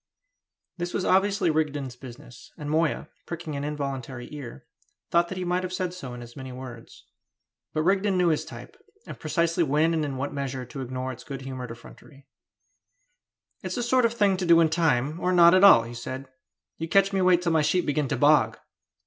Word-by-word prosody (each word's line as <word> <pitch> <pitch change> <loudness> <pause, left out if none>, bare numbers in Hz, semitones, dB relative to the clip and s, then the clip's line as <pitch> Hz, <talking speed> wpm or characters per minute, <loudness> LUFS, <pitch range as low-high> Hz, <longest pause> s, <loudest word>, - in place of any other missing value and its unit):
This 175 0 -4
was 185 - -1
obviously 195 -2 +2
Rigden's 145 -5 -2
business, 125 -1 -13
and 150 -2 -5
Moya, 160 0 0 0.2
pricking 165 -3 -5
an 140 - -4
involuntary 135 -4 -5
ear, 140 -5 -9 0.5
thought 170 0 +3
that 190 - -5
he 185 - -3
might 180 +1 0
have 185 0 -5
said 185 -1 -2
so 135 -9 -8
in 120 - -8
as 120 0 -13
many 130 -1 -8
words. 125 -2 -10 0.7
But 155 - -1
Rigden 195 +2 +2
knew 180 -1 +3
his 155 - +1
type, - - -11 0.3
and - - -9
precisely 170 0 +1
when 155 +3 +2
and 160 -1 0
in 140 -3 -3
what 140 +2 -3
measure 135 -2 -4
to 135 +3 -8
ignore 130 +1 -4
its 125 - -10
good 135 -2 -7
humoured 130 -2 -6
effrontery. 135 +4 -13 1.4
"It's - - -4
the 245 - -2
sort 250 +1 +3
of 230 0 0
thing 200 -4 +2
to 180 - -2
do 170 -1 +7
in 165 -1 +4
time, 155 -2 +1
or 180 - 0
not 170 -1 +7
at 185 +1 +5
all," 195 -13 +8
said 130 +3 -6 0.5
he. 165 - -2
"You - - -12
catch 195 +2 +3
me 190 - +1
wait 180 -1 +4
till 170 - +1
my 160 -1 +3
sheep 175 +4 +1
begin 145 0 0
to - - -2
bog!" 145 -7 +4
155 Hz, 205 wpm, -26 LUFS, 130-180 Hz, 1.4 s, all